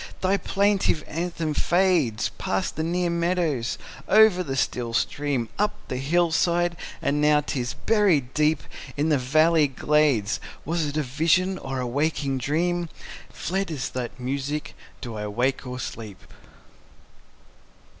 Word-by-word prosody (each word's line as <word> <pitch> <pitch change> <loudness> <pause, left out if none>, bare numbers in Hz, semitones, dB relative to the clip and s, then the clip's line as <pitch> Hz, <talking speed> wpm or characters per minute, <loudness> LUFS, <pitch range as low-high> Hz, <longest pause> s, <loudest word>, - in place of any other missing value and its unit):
thy 190 +1 +3
plaintive 200 -5 +1
anthem 165 -1 -3
fades 170 - +2
Past 95 0 -1
the 155 - -2
near 175 +2 0
meadows, 170 -8 0 0.3
over 215 -3 +6
the 135 -6 -3
still 120 -2 -1
stream, 140 -2 0
Up 210 0 +1
the 130 - -2
hill 165 +6 +2
side; 175 +1 +2 0.3
and 145 +1 +1
now 150 0 +4
'tis 125 -4 -3
buried 185 - +2
deep 155 -1 +2 0.3
In 150 +3 +1
the 150 - +4
next 125 -1 -5
valley 155 +1 +4
glades: 135 -6 +2 0.3
Was 165 0 0
it 145 +1 -4
a 155 - +1
vision, 170 +8 +1
or 135 -1 -4
a 125 - -2
waking 140 +1 -1
dream? 170 +5 0 0.4
Fled 195 +3 -3
is 140 -5 -3
that 125 0 -5
music: 140 +4 -3 0.3
Do 120 -3 -6
I 105 -1 -4
wake 125 +5 -1
or 125 0 -5
sleep? 110 -5 -7
150 Hz, 145 wpm, -25 LUFS, 130-175 Hz, 0.4 s, over